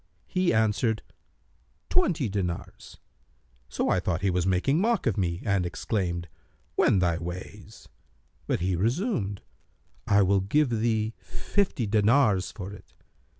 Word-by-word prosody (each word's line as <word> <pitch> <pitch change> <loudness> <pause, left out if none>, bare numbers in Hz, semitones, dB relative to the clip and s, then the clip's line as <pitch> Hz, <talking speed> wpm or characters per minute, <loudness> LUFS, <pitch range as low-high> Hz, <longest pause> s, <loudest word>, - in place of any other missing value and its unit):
He 185 -2 +1
answered, 110 0 +1 0.9
'Twenty 170 - +2
dinars': 95 -4 -4 0.7
so - - -1
I 95 - +3
thought 90 0 -2
he 100 - +2
was 90 0 0
making 115 - +2
mock 230 -1 +1
of 115 -6 +1
me 85 -2 -1
and 100 -2 +2
exclaimed, 85 -1 -2 0.5
'Wend 95 +6 +3
thy 85 -1 +1
ways.' 90 +2 -8 0.6
But - - 0
he 90 +1 +1
resumed, 115 - -1 0.6
'I 100 0 +5
will 95 +1 +3
give 130 +8 +2
thee 110 -1 0
fifty 195 - -1
dinars 105 - +3
for 100 -1 -7
it.' - - -15
100 Hz, 130 wpm, -27 LUFS, 90-120 Hz, 0.9 s, I